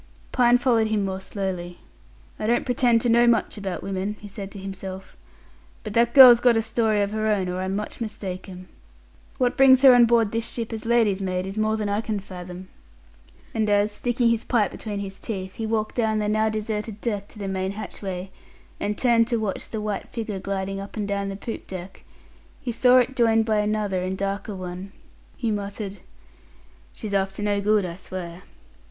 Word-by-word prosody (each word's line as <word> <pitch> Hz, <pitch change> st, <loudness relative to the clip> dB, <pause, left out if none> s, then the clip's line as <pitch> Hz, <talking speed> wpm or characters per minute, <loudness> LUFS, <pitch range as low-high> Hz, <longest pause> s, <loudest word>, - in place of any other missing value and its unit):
Pine 245 Hz, -1 st, +5 dB
followed 235 Hz, -3 st, +2 dB
him 215 Hz, -2 st, 0 dB
more 190 Hz, 0 st, -3 dB
slowly. 185 Hz, -3 st, -4 dB, 0.6 s
"I 215 Hz, -, -2 dB
don't 240 Hz, +1 st, +2 dB
pretend 245 Hz, -2 st, +3 dB
to 245 Hz, -, 0 dB
know 235 Hz, +1 st, +5 dB
much 235 Hz, -, +2 dB
about 195 Hz, -4 st, -5 dB
women," 195 Hz, +2 st, -3 dB
he 205 Hz, -, -10 dB
said 195 Hz, -1 st, -7 dB
to 200 Hz, -, -11 dB
himself, 190 Hz, -1 st, -7 dB, 0.7 s
"but 215 Hz, -, -6 dB
that 235 Hz, +1 st, +2 dB
girl's 250 Hz, -4 st, +10 dB
got 240 Hz, -2 st, +4 dB
a -, -, +3 dB
story 220 Hz, -2 st, +1 dB
of 200 Hz, -, -2 dB
her 215 Hz, 0 st, -1 dB
own, 200 Hz, -4 st, +1 dB
or 180 Hz, +1 st, -3 dB
I'm 190 Hz, +1 st, -2 dB
much 210 Hz, +3 st, -5 dB
mistaken. 185 Hz, -4 st, -6 dB, 0.7 s
What 250 Hz, -2 st, +1 dB
brings 265 Hz, 0 st, +6 dB
her 265 Hz, -2 st, +10 dB
on 245 Hz, -1 st, +7 dB
board 230 Hz, -3 st, +3 dB
this 230 Hz, 0 st, -2 dB
ship 230 Hz, -1 st, -3 dB
as 220 Hz, 0 st, -5 dB
lady's 225 Hz, -5 st, +3 dB
maid 185 Hz, -1 st, -2 dB
is 195 Hz, +1 st, -6 dB
more 215 Hz, 0 st, +1 dB
than 210 Hz, -1 st, -2 dB
I 205 Hz, +1 st, 0 dB
can 215 Hz, -2 st, -3 dB
fathom." 180 Hz, -1 st, -9 dB, 0.9 s
And 220 Hz, -1 st, 0 dB
as, 205 Hz, +1 st, +3 dB
sticking 240 Hz, +2 st, +1 dB
his 230 Hz, -1 st, +1 dB
pipe 215 Hz, -6 st, +1 dB
between 205 Hz, -2 st, -5 dB
his 195 Hz, -1 st, -7 dB
teeth, 190 Hz, -4 st, -5 dB
he 225 Hz, -, -3 dB
walked 215 Hz, -1 st, -1 dB
down 220 Hz, -2 st, +1 dB
the 210 Hz, -1 st, 0 dB
now 215 Hz, +1 st, +2 dB
deserted 215 Hz, 0 st, -3 dB
deck 205 Hz, -3 st, -3 dB
to -, -, -15 dB
the 200 Hz, -2 st, -5 dB
main 190 Hz, 0 st, -2 dB
hatchway, 190 Hz, -3 st, -6 dB, 0.5 s
and 210 Hz, 0 st, -2 dB
turned 235 Hz, -2 st, +3 dB
to 235 Hz, -1 st, 0 dB
watch 215 Hz, -4 st, -3 dB
the 220 Hz, -, -4 dB
white 210 Hz, -1 st, -4 dB
figure 220 Hz, -4 st, -4 dB
gliding 195 Hz, 0 st, -3 dB
up 200 Hz, +2 st, -8 dB
and 205 Hz, -1 st, -2 dB
down 200 Hz, -1 st, -2 dB
the 195 Hz, -, -5 dB
poop 225 Hz, +3 st, -7 dB
deck, 185 Hz, 0 st, -8 dB, 0.6 s
he 255 Hz, -4 st, -4 dB
saw 250 Hz, +2 st, +5 dB
it 255 Hz, +1 st, +2 dB
joined 225 Hz, -2 st, +3 dB
by 220 Hz, -1 st, +1 dB
another 210 Hz, -3 st, 0 dB
and 185 Hz, +1 st, -2 dB
a -, -, -5 dB
darker 200 Hz, +1 st, -3 dB
one, 185 Hz, +1 st, -7 dB, 0.4 s
he 230 Hz, -3 st, -1 dB
muttered, 205 Hz, 0 st, -4 dB, 0.9 s
"She's 210 Hz, -2 st, -7 dB
after 195 Hz, +1 st, -1 dB
no 205 Hz, -1 st, +1 dB
good, 210 Hz, -1 st, +2 dB
I'll 170 Hz, -1 st, -6 dB
swear." 180 Hz, -2 st, -7 dB
210 Hz, 200 wpm, -24 LUFS, 195-225 Hz, 0.9 s, girl's